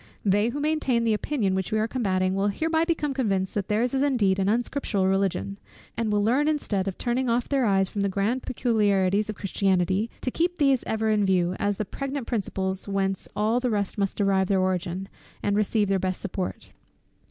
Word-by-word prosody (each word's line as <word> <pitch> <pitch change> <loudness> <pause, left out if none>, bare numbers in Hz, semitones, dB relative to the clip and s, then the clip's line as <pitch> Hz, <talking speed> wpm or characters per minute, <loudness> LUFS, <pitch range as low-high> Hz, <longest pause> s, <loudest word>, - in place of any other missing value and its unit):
They 205 +3 +3
who 285 - -4
maintain 290 -6 +1
the 225 -1 +2
opinion 210 -3 0
which 190 -1 -2
we 215 - +1
are 215 +1 +1
combating, 185 -6 0
will 195 +1 +1
hereby 320 +10 +1
become 310 -4 -1
convinced 195 -8 0
that 200 -3 -2
their's 230 +4 0
is 270 - +1
indeed 220 -9 +2
an 195 +1 +1
unscriptural 230 -3 0
Religion; 190 - 0 0.4
and 225 -1 -1
will 205 0 +2
learn 260 +7 +2
instead 210 -11 0
of 190 - -3
turning 245 +1 -1
off 235 +1 +1
their 275 -3 +1
eyes 195 -1 +3
from 200 - -4
the 200 - +1
grand 205 +7 0
peculiarities 210 -5 +1
of 215 - -3
Christianity, 195 +1 0
to 255 - -1
keep 350 +4 0
these 275 -4 +3
ever 220 0 0
in 210 -1 +2
view, 185 -2 +2
as 205 -1 0
the 215 - -2
pregnant 275 +4 -4
principles 190 -4 -2
whence 195 -1 -1
all 215 +3 +1
the 250 0 -1
rest 205 -2 -1
must 195 -1 -1
derive 195 -2 +2
their 195 -1 +2
origin, 185 0 -1 0.4
and 205 - +1
receive 210 0 +1
their 195 0 +1
best 185 0 -2
support. 185 -1 -5
205 Hz, 200 wpm, -25 LUFS, 190-245 Hz, 0.4 s, They